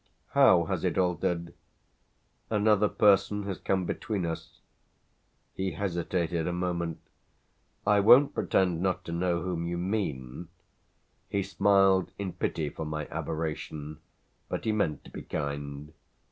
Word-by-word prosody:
"How - - +6
has - - -3
it - - 0
altered?" 85 -1 0 1.0
"Another 105 -1 +3
person 105 0 +3
has 100 -2 -4
come 95 -2 0
between 100 -2 -2
us." 80 -1 -6 0.9
He 95 -1 -2
hesitated 85 -3 -1
a - - 0
moment. 85 -2 -2 0.9
"I 105 0 +4
won't 125 +8 +7
pretend 90 -3 +1
not 95 -1 -1
to - - -5
know 85 0 0
whom 85 -2 -2
you 85 0 -2
mean." 85 - -3 0.8
He 100 -1 0
smiled 95 -1 +3
in 95 -3 -4
pity 80 -3 -2
for 80 - -6
my 75 -1 -4
aberration, 75 -1 -4 0.5
but - - -4
he 110 - +2
meant 100 -8 -1
to - - -14
be - - -7
kind. 70 +1 -5
90 Hz, 130 wpm, -29 LUFS, 80-100 Hz, 1.0 s, won't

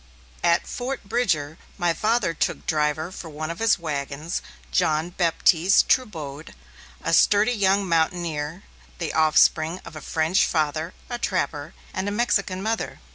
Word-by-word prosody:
At 170 0 +3
Fort 255 +2 -4
Bridger, 185 -9 -1 0.2
my 175 -1 +1
father 215 0 +1
took - - 0
as - - -22
driver 155 +2 0
for 175 -3 -8
one 155 +2 -5
of 170 - -8
his 225 -1 +3
wagons, 150 0 -4 0.3
John 155 - +1
Baptiste 175 +1 +3
Trubode, 160 - -1 0.5
a - - -1
sturdy 210 +3 +5
young 200 -2 +2
mountaineer, 165 0 -1 0.3
the - - -3
offspring 160 +2 +3
of 165 - -10
a 155 - -7
French 160 +6 +1
father 155 +1 -1
a 240 -1 -4
trapper 150 -7 -2 0.2
and 190 - -2
a - - -3
Mexican 200 -4 0
mother. 225 +1 -2
170 Hz, 145 wpm, -24 LUFS, 155-200 Hz, 0.5 s, sturdy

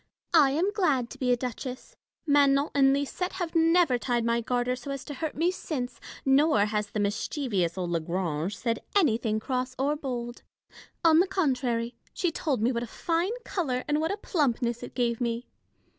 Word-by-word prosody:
I 300 -5 +7
am 335 +9 +1
glad 295 - +1
to - - -10
be 250 -2 +1
a 245 - +3
duchess. 250 +1 -6 0.3
Manon 285 -1 +4
and 270 -1 +5
Lisette 285 +6 -1
have 355 -3 -3
never 330 -5 +4
tied 240 -2 0
my 235 0 +1
garter 245 +1 0
so 255 +2 -9
as 275 -1 -4
to 290 - -6
hurt 305 +3 -4
me 335 +4 +2
since, 255 -9 -4 0.3
nor 270 -5 +4
has 210 -1 -1
the 210 - -4
mischievous 205 - -1
old 180 -2 -2
La 170 - +1
Grange 170 +1 -2
said 230 -1 -1 0.2
anything 230 - +2
cross 255 +2 -2
or 285 +3 +1
bold: 245 -4 -5 0.6
on 320 -1 +7
the 370 - +4
contrary, 250 -10 0 0.2
she 350 - 0
told 280 -8 -1
me 240 - +3
what 235 -2 -2
a 240 - -4
fine 340 - -1
colour 260 -9 -1
and 295 +1 +1
what 320 - 0
a 400 - -2
plumpness 245 - 0
it - - -9
gave 240 -1 0
me. 235 0 -1
255 Hz, 190 wpm, -28 LUFS, 235-305 Hz, 0.6 s, I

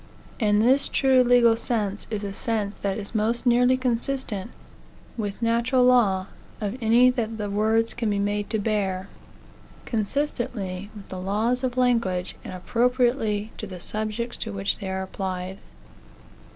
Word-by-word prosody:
And 210 -2 +3
this 265 +4 +5
true 265 -2 +4
legal 240 -2 +5
sense 215 -4 -2
is 215 -2 -3
the 200 -1 -4
sense 210 -1 -1
that 200 0 -2
is 205 0 -6
most 225 +3 0
nearly 250 +1 +4
consistent 245 -4 -2 0.7
with 210 -1 -4
natural 235 +3 +2
law 220 -7 +4 0.3
of 210 0 -3
any 235 +3 +5
that 225 -3 -3
the 205 -2 -3
words 220 +2 +2
can 230 -2 -2
be 205 - 0
made 205 +1 -1
to 220 - 0
bear, 200 -3 -1 0.8
consistently 215 -5 -2
with 205 -2 -11
the 185 -1 -6
laws 220 +7 0
of 255 -1 -2
language, 230 -8 +1
and - - -7
appropriately 235 +1 0
to 215 - -5
the 185 -2 -8
subjects 215 +5 -3
to 225 - -5
which 200 0 -1
they 195 -3 -5
are 190 0 -2
applied. 190 0 -5
220 Hz, 150 wpm, -25 LUFS, 200-240 Hz, 0.8 s, this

